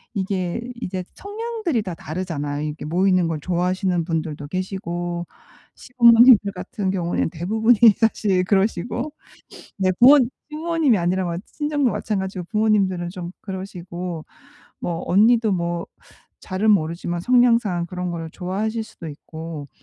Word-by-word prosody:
이게 190 0 -2 0.2
이제 185 -2 -3
성향들이 415 - -3
다 185 -4 -5
다르잖아요. 150 -4 -4
이렇게 150 0 -6
모이는 185 +2 +2
걸 160 -2 -2
좋아하시는 180 0 0
분들도 160 -4 -3
계시고 175 -1 -4 0.5
시부모님들 235 -3 +6
같은 195 +2 -4
경우엔 175 -3 -1
대부분이 220 +8 +2 0.2
사실 205 -4 +2
그러시고. 220 - 0 0.7
네 190 -1 +2
부모 275 +4 +8 0.3
시부모님이 310 - +1
아니라 175 0 -1
친정도 295 -4 0
마찬가지고 190 -3 -3
부모님들은 200 -5 +1
좀 175 -2 -7
그러시고 180 -3 -6 0.5
뭐 170 -1 -3
언니도 220 +3 +4
뭐 170 -1 -2 0.5
잘은 200 +3 0
모르지만 170 0 -1
성향상 230 -6 +3
그런 180 0 -4
거를 165 -1 -5
좋아하실 215 +6 -3
수도 170 - -11
있고. 160 0 -8
185 Hz, 325 characters per minute, -22 LUFS, 170-220 Hz, 0.7 s, 부모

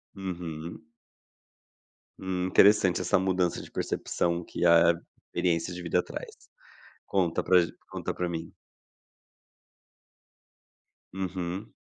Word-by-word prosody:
Uhum. 85 -4 -6 1.4
Hum, 90 -1 -2
interessante 95 -1 +5
essa 90 - +2
mudança 90 -2 0
de - - -12
percepção 85 0 -1
que 90 - -3
a 85 0 +6 0.3
experiência 85 0 -1
de 90 - -6
vida 85 +1 +1
traz. - - -8 0.7
Conta 90 -4 +1
pra 90 -1 +5
gen 85 - -2 0.2
conta - - -3
pra 90 -1 -2
mim. 80 -1 -5 2.6
Uhum. 95 +1 -4
90 Hz, 100 wpm, -28 LUFS, 85-95 Hz, 2.6 s, a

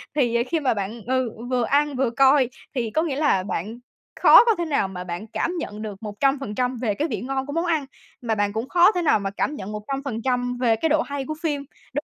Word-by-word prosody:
Thì 235 -4 +2
khi 325 +4 -1
mà 265 -5 +1
bạn 210 +3 -4
ừ, 260 -2 +1 0.2
vừa 250 -2 +1
ăn, 285 +3 +1
vừa 260 -2 +1
coi, 265 +1 +4 0.3
thì 230 -3 -1
có 315 - +1
nghĩa 305 -5 -2
là 285 -11 +2
bạn 210 +5 -4 0.4
khó - - +9
có 455 -3 +4
thể 345 - -1
nào 280 -11 +1
mà 180 -1 -7
bạn 180 +5 -6
cảm 335 +9 -2
nhận 210 -7 -6
được 210 -3 -6
100% 250 +2 -1
về 215 -4 +1
cái 305 - -1
vị - - -4
ngon 265 +1 -2
của 285 - -6
món 335 +2 0
ăn, 315 -5 0 0.4
mà 225 -2 -1
bạn 205 0 0
cũng 225 +5 -3
khó 360 +3 +6
thể 360 -3 -1
nào 295 -9 +3
mà 195 0 -2
cảm 290 +8 -2
nhận 200 -2 -7
100% 245 +1 -2
về 235 -3 +2
cái 320 +8 0
độ 310 +1 +3
hay 280 -3 -4
của 310 - -4
phim. 290 -4 -2 0.3
Đ 290 - 0
255 Hz, 235 wpm, -23 LUFS, 220-290 Hz, 0.4 s, khó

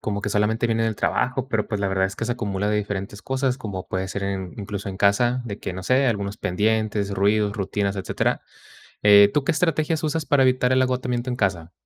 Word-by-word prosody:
como 100 -1 -2
que 105 - -1
solamente 110 +3 +1
viene 115 0 +1
del 110 -1 0
trabajo, 130 +4 -1
pero, 110 -4 0
pues, 105 -2 -3
la 100 - 0
verdad 95 0 +1
es 95 - -7
que 115 - -4
se 120 - -2
acumula 105 -3 -2
de 105 - +1
diferentes 100 0 -4
cosas, 130 -1 -1
como 100 -6 -6
puede 95 0 -2
ser 100 +1 -5
en 95 -2 -3
incluso 100 -1 -5
en 95 - -6
casa, 120 +6 +2
de 105 -4 -6
que, - - -5
no 95 +1 -6
sé, 130 +7 +3
algunos 100 -3 -1
pendientes, 105 +1 0
ruidos, 105 +1 +2
rutinas, 100 0 -2
etcétera, 95 - -1 0.6
eh, 100 +1 +7
¿tú 150 -2 +1
qué 170 - +2
estrategias 160 -1 0
usas 155 0 -1
para 145 -3 +3
evitar 130 0 +3
el 130 - +4
agotamiento 125 -1 -1
en 125 - -3
casa? 90 -6 -1
105 Hz, 225 wpm, -23 LUFS, 100-125 Hz, 0.6 s, eh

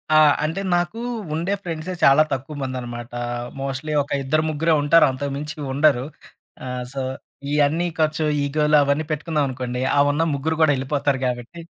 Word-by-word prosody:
ఆ! - - +7 0.3
అంటే 160 +5 -1
నాకు 175 +5 0 0.3
ఉండే 170 +5 -1
ఫ్రెండ్సే 165 +1 -4
చాలా 140 +3 +7
తక్కువ 135 +3 -5
మందనమాట. 120 -3 -5 0.5
మోస్ట్‌లీ 140 +3 -3
ఒక 145 - -7
ఇద్దరు 155 +4 +1
ముగ్గురే 160 +2 +1
ఉంటారు. 155 +3 +6
అంతకు 140 +2 -4
మించి 150 +1 -6 0.2
ఉండరు. 140 -3 +3 0.6
ఆహ్, 125 -1 -4
సో 135 - -3 0.5
ఇయన్నీ 150 +4 +2
ఖర్చు, 155 0 +1 0.2
ఈగోలు 150 +1 +2
అవన్నీ 140 +3 0
పెట్టుకున్నాననుకోండి. 135 -5 -2
అహ్, 140 0 +4
ఉన్న 155 +3 +1
ముగ్గురు 155 +3 -1
గూడా 150 -3 +5
ఎళ్ళిపోతారు 135 0 -1
కాబట్టి. 125 +6 -5
145 Hz, 150 wpm, -22 LUFS, 135-155 Hz, 0.6 s, ఆ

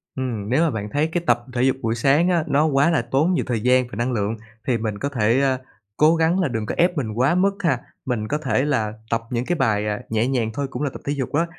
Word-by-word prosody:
Ừm, 120 -6 -3
nếu 135 +7 +3
mà 165 - +2
bạn 105 -3 -4
thấy 145 +7 +1
cái 170 +1 -2
tập 120 0 +2
thể 125 0 +1
dục 130 0 +3
buổi 115 0 0
sáng 140 +9 +3
á, 170 -3 +2
nó 145 +2 +3
quá 145 +1 +3
là 165 -6 +2
tốn 135 +9 +1
nhiều - - 0
thời 115 -3 -1
gian 125 +1 +3
và - - -7
năng 120 +3 0
lượng 110 0 -1 0.3
thì 125 -3 +2
mình 110 -2 -3
có 140 - -2
thể, 120 -2 +2
ờ, 135 -2 +2 0.4
cố 155 +2 +5
gắng 165 +3 +2
là 185 - +2
đừng 115 -4 -3
có - - -3
ép 175 0 +2
mình 120 -6 -2
quá 130 +9 +2
mức 195 +2 +3
ha. 145 -8 +2 0.3
Mình 120 -4 -2
có 150 - 0
thể 135 -2 0
là 115 -8 0 0.2
tập 115 0 0
những 120 0 -1
cái 175 - 0
bài 105 -8 +1 0.2
nhẹ 110 +2 +1
nhàng 125 -4 0
thôi 140 +3 -2
cũng - - -6
là 145 - 0
tập - - -10
thể 145 - 0
dục 135 -4 -4
á, 165 +4 +2
130 Hz, 280 wpm, -22 LUFS, 115-150 Hz, 0.4 s, cố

